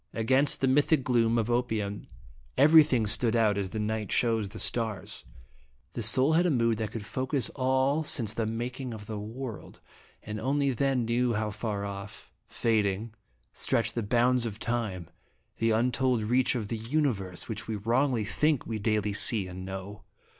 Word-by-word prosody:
Against 130 +5 +2
the 135 - +3
mystic 145 +1 +3
gloom 120 -2 +2
of 115 +1 0
opium 110 -4 -2 0.5
everything 145 -5 +6
stood 110 +2 0
out 110 -3 +3
as 100 -2 -2
the 110 - -6
night 105 -1 -2
shows 115 -4 +1
the 110 - -10
stars; 110 -4 -2 0.7
the - - -4
soul 135 +4 +4
had 175 +3 +3
a - - +2
mood 115 -6 +1
that 110 -2 -2
could 110 -2 -7
focus 130 +2 0
All 130 +3 +1
since 115 -8 0
the 110 -1 -2
making 120 +2 -4
of 105 -1 -10
the 110 -1 -5
world, 115 +2 -7 0.4
and 105 0 -5
only 140 +3 +1
then 130 -1 0
knew 120 +1 +1
how 105 0 -1
far 105 -1 -3
off, 100 0 -8 0.2
fading, 110 -1 0 0.4
stretch 115 -1 0
the 120 - -2
bounds 120 +2 +2
of 105 -2 -6
Time, 110 -8 -3 0.5
the 115 - +2
untold 125 +1 +1
reach 125 +4 +2
of 110 -4 -3
the 115 - -3
Universe, 115 - -2
which 110 -2 -6
we 110 - -2
wrongly 115 +2 +1
think 150 +5 0
we 110 -1 -4
daily 105 -1 0
see 105 0 +4
and 95 0 -8
know. 95 +2 -7
115 Hz, 170 wpm, -28 LUFS, 105-130 Hz, 0.7 s, everything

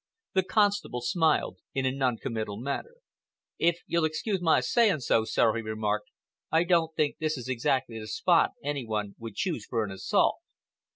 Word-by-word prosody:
The 190 - +4
constable 200 - +1
smiled 160 +5 +1 0.2
in 135 -1 0
a 130 - +2
non 130 -3 0
committal 110 -5 -4
manner. 140 - -4 0.6
"If 170 +1 +2
you'll 170 -1 +1
excuse 180 +5 -1
my 165 -5 +4
saying 200 - +2
so, 115 -2 +2
sir," 110 0 +2
he 115 - -1
remarked, 110 -1 -2 0.4
"I 160 +1 +4
don't 165 -2 +2
think 150 -2 0
this 155 -1 -1
is 125 -1 -7
exactly 120 -2 0
the 110 - -7
spot 110 - +3
any 145 -2 -2
one 105 -3 -3
would 115 -3 -8
choose 165 - -2
for 115 -2 0
an 100 - -7
assault." 95 - +1
130 Hz, 175 wpm, -28 LUFS, 115-165 Hz, 0.6 s, The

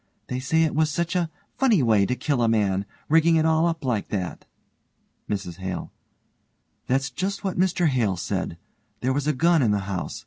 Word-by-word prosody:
They 125 - -2
say 160 +5 +2
it 160 - 0
was 155 +1 +2
such 170 +4 -2
a 175 -2 +1 0.3
funny 230 - +4
way 105 -4 +3
to 125 - 0
kill 140 -2 0
a 115 - +3
man, 100 -3 +1 0.2
rigging 165 +1 +4
it 160 -1 +3
all 160 +1 +3
up 165 -4 -3
like 115 -6 0
that. 95 -4 -4 0.8
MRS 95 -5 -3
HALE: 95 -1 -5 1.0
That's 135 +1 0
just 195 +5 -3
what 190 -3 -2
Mr 185 -1 +2
Hale 120 - +1
said. 85 0 -3 0.4
There 130 +1 +1
was 145 +1 -1
a 150 - +3
gun 165 +3 +3
in 120 - +3
the 105 -1 +1
house. 95 -3 -4
135 Hz, 195 wpm, -24 LUFS, 105-165 Hz, 1.0 s, funny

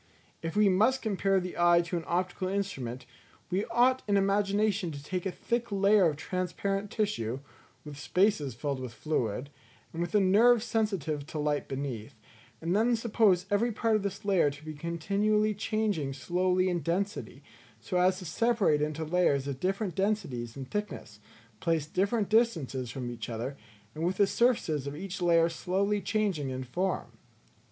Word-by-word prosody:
If 165 0 -4
we 210 0 +5
must 220 +8 +3
compare 195 -3 +1
the 180 0 -5
eye 175 0 +6
to 175 +1 -4
an 170 - -2
optical 180 +1 -1
instrument, 135 -11 -3 0.5
we 190 +3 0
ought 245 +3 +3
in 200 -1 +3
imagination 200 -1 +1
to 140 -1 -8
take 185 +4 -3
a - - -2
thick 235 +4 -2
layer 200 -2 +4
of 150 - -3
transparent 185 +5 -2
tissue, 200 - -1 0.5
with 145 -1 -8
spaces 160 - +1
filled 140 +2 -3
with 125 -3 -7
fluid, 130 -3 -2 0.4
and 165 - -3
with 175 +4 -2
a - - +6
nerve 215 +5 +5
sensitive 195 - -1
to 155 - -6
light 150 -1 -1
beneath, 135 -3 -5 0.5
and 170 +3 0
then 235 +3 +3
suppose 215 -5 +2
every 225 +4 +2
part 225 +1 +1
of 215 - +1
this 200 +1 -5
layer 190 -7 +3
to 145 +2 -11
be 155 - -5
continually 200 +7 0
changing 205 -9 -1
slowly 180 +6 +1
in 175 -1 0
density, 180 +6 -3 0.4
so 180 - -3
as 185 +1 +3
to 185 - -8
separate 205 -5 +2
into 155 +1 -2
layers 155 -5 +2
of 135 -2 -4
different 195 0 -1
densities 150 - -2
and 130 -1 -8
thicknesses, 210 - -5 0.4
placed 160 0 0
at - - -29
different 200 +3 +1
distances 165 - +1
from 120 0 -5
each 115 -1 -6
other, 120 +4 -4 0.4
and 155 - -5
with 180 +2 0
the 200 - +5
surfaces 195 - +1
of 140 - -5
each 190 +3 -6
layer 170 -1 +4
slowly 195 +5 -1
changing 195 -8 -1
in 130 0 -4
form. 180 +9 -2
185 Hz, 170 wpm, -29 LUFS, 150-205 Hz, 0.5 s, eye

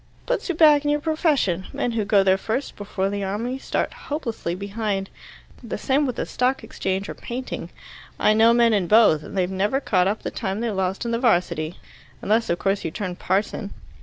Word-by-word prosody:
"Puts - - -2
you 355 - 0
back 300 -2 +6
in 295 - 0
your 295 0 +2
profession. 295 - 0
Men 245 - -1
who 225 -3 -1
go 200 -2 +4
there 190 0 +4
first, 225 +8 -3
before 200 -1 -2
the 200 0 -3
Army, 230 +7 -3
start - - -2 0.2
hopelessly 230 - -3
behind. 200 0 -3 0.5
The 235 - -5
same 275 +2 +1
with 250 - -3
the - - -2
Stock 255 0 0
Exchange 195 -2 -3
or - - -5
Painting. 255 +2 -6 0.5
I 215 - +4
know 225 +2 +6
men 235 -1 +4
in 195 -4 +1
both, 210 -8 +5
and 195 - -8
they've 185 0 +1
never 205 +7 +1
caught 185 -9 +2
up 210 +2 -2
the - - -3
time 195 -3 -3
they 235 -1 -1
lost 190 +2 -2
in 235 - -1
the 230 - 0
'Varsity 175 - +1 0.4
unless, 220 - +1
of 170 - +1
course, 195 +2 0
you - - -2
turn 180 +2 -4
parson." 200 +3 -2
215 Hz, 205 wpm, -23 LUFS, 190-250 Hz, 0.5 s, back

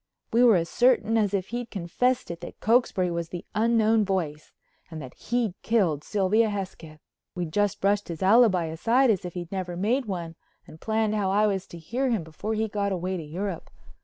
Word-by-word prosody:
We 235 +2 +5
were 235 -4 +7
as 170 -2 +1
certain 240 +1 +3
as 210 -3 +2
if 195 -2 -2
he'd 240 0 -4
confessed 235 +6 -1
it 170 - -8
that 175 - -9
Cokesbury 215 -6 +2
was 170 -1 -3
the 175 - -7
Unknown 225 0 +3
Voice 165 -6 -3 0.4
and 160 -2 -7
that 130 -4 -9
he'd 235 -4 -1
killed 180 -10 +1
Sylvia 210 +2 +2
Hesketh. 185 -6 -6 0.4
We 180 -1 -2
just 205 +5 0
brushed 200 +1 +1
his 170 0 -5
alibi 195 -4 +5
aside 230 +11 +2
as 190 -4 -1
if 175 - -7
he'd 175 -1 -6
never 185 -3 -4
made 240 +8 +1
one 175 -5 -4 0.3
and 160 - -14
planned 220 -1 0
how 205 -3 0
I 205 +2 +3
was 195 -3 -1
to 170 - -10
hear 240 +11 -2
him 220 -8 0
before 160 +8 -4
he 220 +1 0
got 200 -1 -2
away 185 0 -2
to 175 - -4
Europe. 175 +4 -5
195 Hz, 200 wpm, -26 LUFS, 175-225 Hz, 0.4 s, were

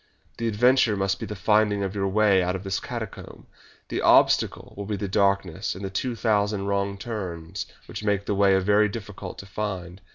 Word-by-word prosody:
The 115 - -1
adventure 115 0 +3
must 95 0 0
be - - -5
the 105 - -5
finding 105 +1 +2
of 95 -1 -3
your 100 -1 -1
way 100 -1 +4
out 90 +1 0
of 95 - -5
this 95 -1 -2
catacomb. - - -7 0.4
The - - -2
obstacle - - +3
will 100 0 -6
be 105 - -1
the 100 - -3
darkness 100 -4 0
and 100 +1 -6
the 95 - -5
two 120 +5 -2
thousand 105 -3 +1
wrong 100 0 -1
turns 95 -5 -5 0.2
which - - -7
make 100 -1 0
the - - -1
way 100 -1 +4
a - - +4
little 105 +2 +3
difficult 105 -1 -7
to - - -9
find. 95 -3 -5
100 Hz, 200 wpm, -25 LUFS, 95-105 Hz, 0.4 s, way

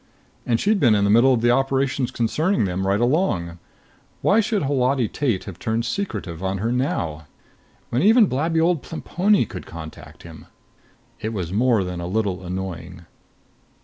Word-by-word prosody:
And 115 -1 +2
she'd 210 0 +2
been 120 -9 +4
in 100 - +2
the 100 - +3
middle 120 +5 +5
of 120 -3 +2
the 120 +1 +3
operations 135 0 0
concerning 155 - 0
them 95 +1 -2
right 100 +1 +2
along. 120 - 0 0.6
Why 210 - +4
should 210 -4 0
Holati 130 -3 +1
Tate 120 -5 -1
have 90 -3 -9
turned 115 +1 -1
secretive 110 - -4
on 95 0 -2
her 110 +5 -1
now? 80 - -2 0.6
When 120 - +1
even 220 +3 +6
blabby 160 +2 0
old 165 -2 +2
Plemponi 190 +4 0
could 100 -7 -9
contact 80 -1 -10
him. 80 -2 -12 0.7
It 110 +1 -4
was 90 -4 -4
more 115 -1 +2
than 90 -1 -5
a 85 - -4
little 95 -1 -2
annoying.... 90 -1 -6
115 Hz, 165 wpm, -22 LUFS, 95-140 Hz, 0.7 s, even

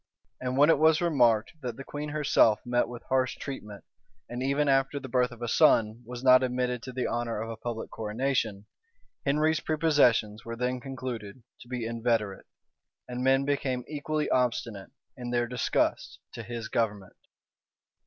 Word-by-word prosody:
And 130 0 -3
when 145 +3 +6
it 155 - +3
was 160 0 +5
remarked 120 -10 +3
that 125 -4 -5
the 135 - -7
queen 145 +2 -6
herself 145 -7 +3
met 120 0 +1
with 120 0 -9
harsh 130 -1 +1
treatment, 105 -7 -7 0.4
and 120 +1 -5
even 140 +2 +1
after 135 +1 +2
the 135 - -8
birth 125 0 +2
of 120 -1 -10
a - - -2
son, 110 0 +3
was 125 0 -7
not 130 -1 +7
admitted 125 -1 -1
to 130 - -7
the 125 0 -2
honor 120 -2 -2
of 115 +1 -4
a - - -5
public 115 0 -5
coronation, 110 -2 -2 0.6
Henry's 155 +3 +2
prepossessions 145 -10 +2
were 115 0 -6
then 125 +1 -1
concluded 125 -4 -6 0.2
to - - -14
be 125 -2 -4
inveterate, 115 -3 -1 0.6
and 125 0 -4
men 135 +1 +3
became 135 -3 -1
equally 150 0 -2
obstinate 115 -5 0 0.3
in 125 -2 -6
their 120 0 +1
disgust 125 +1 -1 0.2
to - - -6
his 115 0 -6
government. 105 -5 -2
125 Hz, 165 wpm, -28 LUFS, 115-135 Hz, 0.6 s, not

